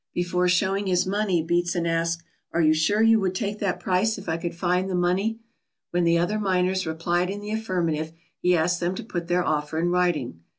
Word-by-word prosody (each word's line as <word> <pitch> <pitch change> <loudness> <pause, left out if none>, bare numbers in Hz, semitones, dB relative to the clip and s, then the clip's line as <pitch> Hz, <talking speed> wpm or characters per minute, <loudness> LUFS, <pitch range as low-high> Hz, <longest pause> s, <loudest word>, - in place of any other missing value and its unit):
Before 180 +1 +1
showing 195 +2 +1
his 180 -1 +2
money 190 -4 0
Beatson 175 0 0
asked: 165 0 0 0.3
"Are 170 - +2
you 155 0 +5
sure 205 +8 +2
you 225 0 +5
would 190 -2 -1
take 205 +1 -3
that 195 -3 -1
price 195 +4 +1
if - - -10
I 160 - 0
could 170 0 -4
find 180 +2 0
the 185 - -1
money?" 185 +5 +1 0.5
When 175 0 +1
the 170 0 +4
other 180 +6 0
miners 185 -2 +1
replied 175 +3 0
in 200 +1 -4
the 205 +1 -6
affirmative, 175 -8 -1 0.3
he 180 0 +3
asked 175 +2 +1
them 175 +2 -1
to - - -6
put 175 -6 -5
their 175 0 +1
offer 150 0 -1
in 170 +2 +1
writing. 170 - 0
180 Hz, 210 wpm, -25 LUFS, 170-190 Hz, 0.5 s, you